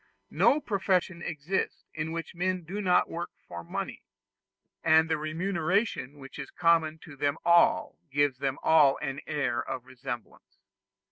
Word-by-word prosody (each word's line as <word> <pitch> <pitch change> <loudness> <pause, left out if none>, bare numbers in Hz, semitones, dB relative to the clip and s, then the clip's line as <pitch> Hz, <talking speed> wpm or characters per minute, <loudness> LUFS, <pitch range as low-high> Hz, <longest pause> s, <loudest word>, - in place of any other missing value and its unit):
No 290 - +4
profession 190 - 0
exists 165 +3 -3
in 155 +1 -3
which 165 +2 -5
men 180 0 -1
do 190 +6 -4
not 180 -3 +3
work 170 +1 -5 0.2
for 85 -1 -7
money; - - -5 0.8
and 160 0 +5
the 160 - +1
remuneration 170 - -1
which 135 +1 -11
is 140 - -6
common 165 -2 +2
to 155 - -11
them 145 +2 0
all 170 0 +4
gives 140 -1 +1
them 135 -1 -1
all 150 -4 +5
an 140 -1 -4
air 140 -6 0
of 130 -2 -5
resemblance. 120 -2 -8
160 Hz, 145 wpm, -29 LUFS, 140-175 Hz, 0.8 s, and